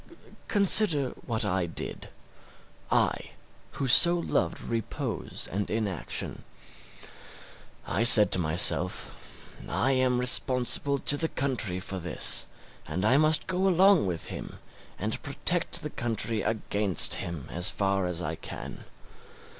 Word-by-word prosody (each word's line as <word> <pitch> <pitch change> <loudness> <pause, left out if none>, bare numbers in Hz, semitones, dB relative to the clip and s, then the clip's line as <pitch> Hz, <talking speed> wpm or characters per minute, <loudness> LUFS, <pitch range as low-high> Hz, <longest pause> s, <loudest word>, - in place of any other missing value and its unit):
Consider 195 - +4 0.2
what 115 -3 -2
I 95 -3 -2
did 85 - -5 0.8
I - - -1 0.4
who 135 - -4
so 170 +7 +6
loved 170 - -3
repose 115 -2 -5
and 100 +2 -4
inaction. 105 -7 -5 1.4
I 95 - -3
said 110 -4 +7
to - - +6
myself, 90 +2 -2
I 135 - -1
am 130 -1 0
responsible 125 +2 +4
to 145 +1 -1
the 160 - -1
country 120 -9 -2
for 95 +1 -6
this, 90 -2 +1 0.4
and 95 +3 -4
I 130 +5 +3
must 155 +1 +3
go 185 +1 -2
along 190 - +3
with 85 -3 -4
him - - -9 0.4
and - - -5
protect - - -1
the - - -6
country 115 -2 -3
against 100 -4 -1
him 85 -5 -7
as 90 +1 +1
far 95 -2 -2
as 90 0 -3
I - - -4
can. - - -10
115 Hz, 125 wpm, -26 LUFS, 95-140 Hz, 1.4 s, said